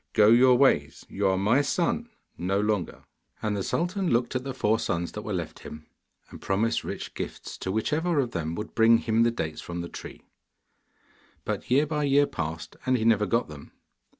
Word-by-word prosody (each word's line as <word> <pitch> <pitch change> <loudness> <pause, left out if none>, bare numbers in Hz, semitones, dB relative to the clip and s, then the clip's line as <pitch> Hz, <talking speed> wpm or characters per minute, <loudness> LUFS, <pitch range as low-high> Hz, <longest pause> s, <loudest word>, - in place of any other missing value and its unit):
Go 105 -1 +6
your 125 +2 +6
ways, 75 - +2
you 100 0 0
are 95 0 +2
my 110 +8 +3
son 180 +10 -1 0.3
no 95 +3 -1
longer!' 105 -4 -1 0.4
And 105 -1 0
the 100 - -2
sultan 180 - -1
looked 120 +2 +1
at 130 - -1
the 135 - -4
four 110 -4 +1
sons 85 -4 -2
that 105 - -6
were 105 - -6
left 85 -5 -4
him, 75 0 -10 0.5
and - - -11
promised 110 +4 0
rich - - -6
gifts - - -6
to 95 - -3
whichever 150 - 0
of 125 -4 0
them 80 -3 -3
would 105 +3 -6
bring 115 0 +5
him 115 0 +1
the 120 - +4
dates 80 -9 -4
from 85 0 -5
the 85 - -5
tree. - - -10 1.2
But - - -4
year 140 +4 +4
by 150 -1 -1
year 140 +1 +4
passed, 85 - -5
and 130 -1 +2
he 110 - -2
never 105 -2 +3
got 115 +1 +1
them. 75 -2 -12
110 Hz, 200 wpm, -27 LUFS, 95-130 Hz, 1.2 s, Go